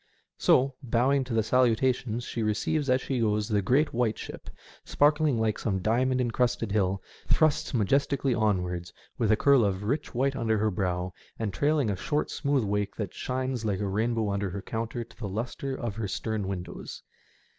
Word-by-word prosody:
So, 135 +1 +4
bowing 130 +2 +2
to 125 - -5
the 110 - +3
salutations 120 0 +2
she 120 - -4
receives 120 +7 0
as 130 0 +3
she 130 -3 -2
goes, 105 -2 +1
the 105 -3 +1
great 135 +10 +2
white 115 -2 +1
ship, - - -8 0.3
sparkling 150 -3 +3
like 110 -1 0
some 100 -4 0
diamond 125 +6 +1
encrusted 120 -2 0
hill, 95 -2 +1 0.2
thrusts 155 -2 +2
majestically 135 +4 +2
onwards, 90 -6 0 0.3
with 110 -3 +2
a 110 - +4
curl 140 -2 +5
of 100 -1 0
rich 130 +5 -2
white 135 +2 +1
under 110 -4 +1
her 110 +1 +1
bow, 90 -1 -2 0.2
and 110 -4 -2
trailing 145 -6 +2
a - - -1
short, 150 +10 -1
smooth 140 -3 +1
wake 100 0 -1
that 105 -5 -4
shines 130 -2 -2
like 100 -4 -1
a 105 - -1
rainbow 110 +1 0
under 100 0 -1
her 95 +1 -6
counter 115 +1 -3
to 115 - -19
the 105 -4 -4
lustre 120 +6 -3
of 115 -5 -4
her 110 -3 -2
stem 105 0 -2
windows. 90 -2 -6
115 Hz, 180 wpm, -28 LUFS, 105-130 Hz, 0.3 s, curl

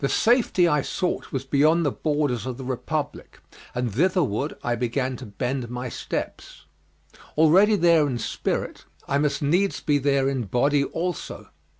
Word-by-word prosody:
The 140 - 0
safety 230 -7 +3
I 150 -3 +2
sought 180 +5 -3
was 135 -1 -3
beyond 155 +5 +3
the 145 - +2
borders 145 -7 -1
of 125 -2 -4
the 135 - -7
Republic, 130 -1 -4 0.4
and 125 -3 -2
thitherward 150 - +1
I 120 - 0
began 125 +2 -1
to 125 - -9
bend 125 +4 -3
my 125 +1 -4
steps. - - -6 0.7
Already 185 +7 +5
there 170 -5 +4
in 130 -3 -2
spirit, 115 - -3 0.2
I 140 - +1
must 150 0 0
needs 180 +7 +1
be 145 -1 +1
there 140 -1 +2
in 130 -4 -1
body 140 +7 +2
also. 175 +5 -4
140 Hz, 160 wpm, -24 LUFS, 125-160 Hz, 0.7 s, Already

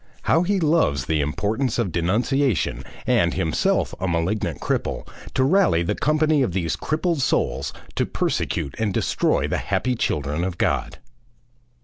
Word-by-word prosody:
How 165 - +3
he 195 +2 +1
loves 150 - +2
the 80 0 +1
importance 110 - -1
of 115 -7 0
denunciation, 105 - 0 0.2
and, 85 0 +2
himself 80 -5 +1
a 95 - -1
malignant 85 +5 -1
cripple, - - -2 0.3
to 130 - +3
rally 130 - +3
the 100 +5 0
company 155 +3 +2
of 120 -10 0
these 85 -4 -1
crippled 160 0 -1
souls - - 0 0.2
to - - 0
persecute 70 - -1
and 105 -4 0
destroy - - +1
the - - -1
happy 125 - 0
children 75 - -1
of 90 -1 -3
God! - - 0
105 Hz, 145 wpm, -23 LUFS, -, 0.3 s, How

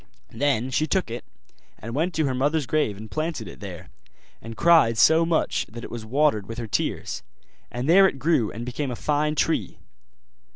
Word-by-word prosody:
Then 130 -3 0
she 155 +4 +1
took 185 - 0
it, 120 - -5 0.5
and 115 +1 -8
went 165 +6 -1
to 155 - +1
her 135 - 0
mother's 145 +3 0
grave 125 -8 0
and 110 +1 -10
planted 155 - -3
it 85 - -11
there; 95 -5 -9 0.5
and 115 0 -9
cried 165 -10 +5
so 160 +5 +5
much 165 -1 0
that 115 +2 -9
it - - -8
was 115 -2 -7
watered 130 -5 +1
with 115 - -7
her 120 - -4
tears; 105 - -2 0.5
and 125 +3 -4
there 190 +4 +7
it 140 - -4
grew 135 -6 +1
and 115 +2 -6
became 130 +3 -3
a 125 - -4
fine 150 +3 0
tree. 160 +2 0
135 Hz, 195 wpm, -24 LUFS, 115-155 Hz, 0.5 s, there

